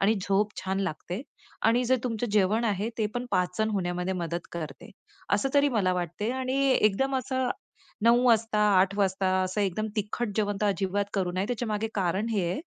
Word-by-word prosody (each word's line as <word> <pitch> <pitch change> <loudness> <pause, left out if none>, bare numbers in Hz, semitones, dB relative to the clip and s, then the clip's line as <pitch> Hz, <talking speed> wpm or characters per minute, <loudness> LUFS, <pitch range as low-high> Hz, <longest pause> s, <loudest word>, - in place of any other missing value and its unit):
आणि 205 +3 +4
झोप 200 +2 +2
छान 190 +1 -1
लागते, 185 - -4 0.4
आणि 235 +3 +3
जे 260 +2 +3
तुमचं 235 -1 -1
जेवण 210 +3 +3
आहे, 210 0 0
ते 215 - +2
पण 245 +1 -3
पाचन 180 +4 +1
होण्यामध्ये 180 -1 -1
मदत 170 -1 -3
करते. 155 +3 -7 0.4
असं 240 +7 +1
तरी 285 0 +5
मला 185 -3 +2
वाटते 180 +5 -2
आणि 260 0 -2 0.2
एकदम 265 +5 +2
असं 260 0 -1 0.6
9:00 240 +2 +5
वाजता 225 -2 +3 0.2
8:00 195 +1 +1
वाजता 190 -1 +1
असं 185 +3 -2
एकदम 200 +2 0
तिखट 215 +3 -2
जेवण 205 -2 0
तर - - +3
अजिबात 200 0 0
करू 180 -3 0
नये. 190 +2 0
त्याच्यामागे 225 -3 -2
कारण 195 +3 0
हे 200 -5 +1
आहे, 185 - -2
205 Hz, 180 wpm, -27 LUFS, 185-230 Hz, 0.6 s, तरी